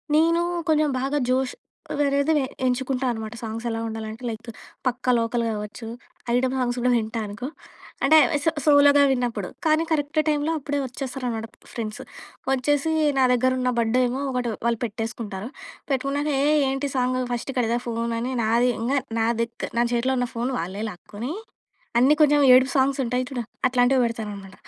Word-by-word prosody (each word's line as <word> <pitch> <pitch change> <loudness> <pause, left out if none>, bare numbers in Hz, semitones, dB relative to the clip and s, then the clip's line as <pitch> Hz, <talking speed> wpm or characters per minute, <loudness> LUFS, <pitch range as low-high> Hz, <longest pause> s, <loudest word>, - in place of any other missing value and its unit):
నేనూ 335 +2 +4 0.3
కొంజెం 310 -1 +3
బాగా 275 +2 0
జోషు 255 0 +1 0.4
వేరేది 280 +2 +2
వే 285 - +2 0.2
ఎంచుకుంటా 255 +1 0
అనమాట. 220 -1 -5
సాంగ్సెలా 225 +1 -3
ఉండాలంటే 220 +1 -6
లైకు 230 +1 -7 0.3
'పక్కా 250 0 +1
లోకల్' 230 +1 0
గావచ్చు, 210 +1 -5 0.5
ఐటమ్ 255 +1 +2
సాంగ్స్ 245 -1 0
గూడా 250 +1 +2
వింటా 225 0 -2
అనుకో. 215 +5 -6 0.6
అంటే 310 +3 +6
అవే, 290 - 0
సో 325 - +3
సోలోగా 285 -1 +6
విన్నప్పుడు. 240 -7 -1 0.2
కానీ, 310 +1 +3
కరెక్ట్ 300 0 +1
టైమ్‌లో 300 +1 +1
అప్పుడే 285 0 -2
వచ్చేసారనమాట 250 -3 -4 0.3
ఫ్రెండ్సు. 215 -2 -5 0.5
వచ్చేసి, 285 +4 +1 0.3
నా 265 - +4
దెగ్గరున్న 255 +1 +2
బడ్డేమో 250 +3 +1
1 250 -2 -1 0.2
వాళ్ళు 235 -1 +1
పెట్టేసుకుంటారు, 220 -2 -5 0.4
పెట్టుకున్నాక 275 +3 0
ఏయ్! 300 +1 +4
ఏంటి 270 +1 -2
సాంగు? 255 0 +1
ఫస్టిక్కడిదా 240 -1 -1
ఫోనని 230 +1 -2
నాది 235 +3 +3
ఇంగ 235 +4 -1 0.3
నాదిక్ 230 +1 -1
నా - - +4
చేతిలో 255 +2 +1
ఉన్న 245 - 0
ఫోను 245 +3 -1
వాళ్ళే 190 +5 -4
లాక్కునీ, 210 - -7 0.7
అన్నీ 270 +4 +6
కొంచెం 295 -1 +5
ఏడుపు 260 +1 +5
సాంగ్సుంటాయి 260 -2 +1
చూడ, 265 - -5 0.3
అట్లాంటివి 250 +1 +3
బెడతారనమాట. 205 -4 -6
250 Hz, 145 wpm, -24 LUFS, 230-275 Hz, 0.7 s, అంటే